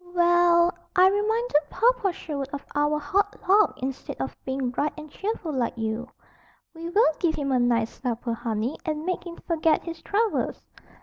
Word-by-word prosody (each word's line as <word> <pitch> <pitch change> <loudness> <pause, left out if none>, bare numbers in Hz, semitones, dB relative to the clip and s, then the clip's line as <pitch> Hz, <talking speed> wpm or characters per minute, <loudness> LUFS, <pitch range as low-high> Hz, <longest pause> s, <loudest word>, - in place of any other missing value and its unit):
"We - - -2
ell! 345 0 +5 0.2
I 370 0 +7
reminded 415 -6 +1
Papa 480 -4 +2
Sherwood 285 -5 -5
of 285 - -6
our 295 +1 +2
hard 390 +8 0
luck 410 +2 +4
instead 265 0 -4
of - - -3
being 265 -1 -1
bright 290 +4 -1
and 305 -1 -9
cheerful 390 -5 -3
like 245 -3 -1
you." 225 +2 -2 0.7
"We 335 0 -6
will 365 -3 +4
give 330 -3 +1
him 280 -2 -2
a 255 - +3
nice 235 -2 +1
supper, 240 -2 -2
honey, 230 +2 -2
and 310 -2 -3
make 365 -1 -2
him 340 - -7
forget 325 -2 +2
his 335 -1 -7
troubles. 435 +1 0
310 Hz, 175 wpm, -25 LUFS, 265-365 Hz, 0.7 s, I